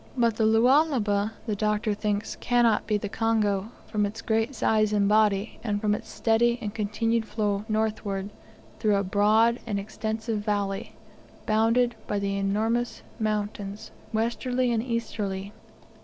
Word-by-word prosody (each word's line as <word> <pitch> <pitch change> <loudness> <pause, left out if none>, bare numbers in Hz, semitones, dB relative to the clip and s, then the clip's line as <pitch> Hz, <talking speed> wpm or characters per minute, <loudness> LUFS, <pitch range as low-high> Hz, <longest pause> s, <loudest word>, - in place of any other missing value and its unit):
But 230 -3 +2
the 220 - +2
Lualaba, 225 -3 +3
the 215 -3 -1
Doctor 210 +1 0
thinks, 210 0 -2
cannot 240 -3 +2
be 210 -1 +2
the 205 - -4
Congo, 215 -2 0 0.2
from 210 -2 -1
its 205 +3 -3
great 225 +4 0
size 215 -1 +2
and 200 -1 +3
body, 210 0 +2
and 205 -3 -1
from 210 0 +1
its 210 - -5
steady 235 +1 +2
and 210 -4 -5
continued 225 +2 0
flow 205 -2 -1
northward 210 -2 -1 0.5
through 210 -2 +3
a 200 - +1
broad 215 +5 +3
and 205 -3 -1
extensive 220 +2 -3
valley, 205 -2 -2 0.5
bounded 230 +3 +3
by - - -2
enormous 200 +4 -1 0.2
mountains 210 -1 -3 0.2
westerly 240 +3 0
and 225 -2 +1
easterly. 210 -5 -3
215 Hz, 140 wpm, -26 LUFS, 205-225 Hz, 0.5 s, Lualaba